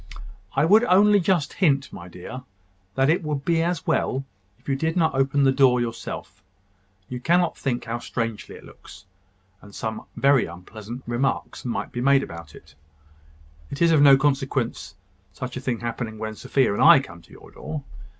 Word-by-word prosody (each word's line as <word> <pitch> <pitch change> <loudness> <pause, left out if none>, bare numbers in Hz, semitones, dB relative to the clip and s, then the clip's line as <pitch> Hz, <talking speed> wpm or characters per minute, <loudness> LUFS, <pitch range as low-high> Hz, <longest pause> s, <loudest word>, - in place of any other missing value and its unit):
"I - - +3
would 210 +7 +5
only 205 +1 +5
just 170 -4 0
hint, 140 -7 +1
my 85 - -9
dear, 90 +9 -9 0.5
that 135 - +2
it 165 +4 +2
would 150 -3 -4
be 165 -1 +2
as 170 0 -2
well 135 +1 0 0.3
if - - -29
you 135 - 0
did 160 +5 -2
not 160 -2 +2
open 135 +1 +1
the 135 - +5
door 130 -2 +4
yourself. 120 -1 -6 0.7
You 125 +1 -6
cannot 175 +6 +2
think 125 -3 -3
how 115 0 -4
strangely 115 -3 -5
it - - -13
looks: 100 +3 -15 0.6
and 100 -1 -15
some 110 -1 -5
very 140 -2 +3
unpleasant 110 +8 -10
remarks 120 +3 -2
might 120 - -3
be 120 - -4
made 140 +1 +4
upon 85 -1 -9
it. - - -16 1.0
It 140 - -7
is 170 -1 +4
of 155 -3 +4
no 140 -2 +8
consequence 135 -3 -1 0.4
such 125 -1 -6
a 130 - -5
thing 125 -3 -3
happening 115 -1 -4
when 110 0 -5
Sophia 125 +1 0
and - - -2
I 165 -2 +8
come 85 -11 -10
to - - -23
your - - -15
door. 150 -3 -7
135 Hz, 180 wpm, -23 LUFS, 115-150 Hz, 1.0 s, no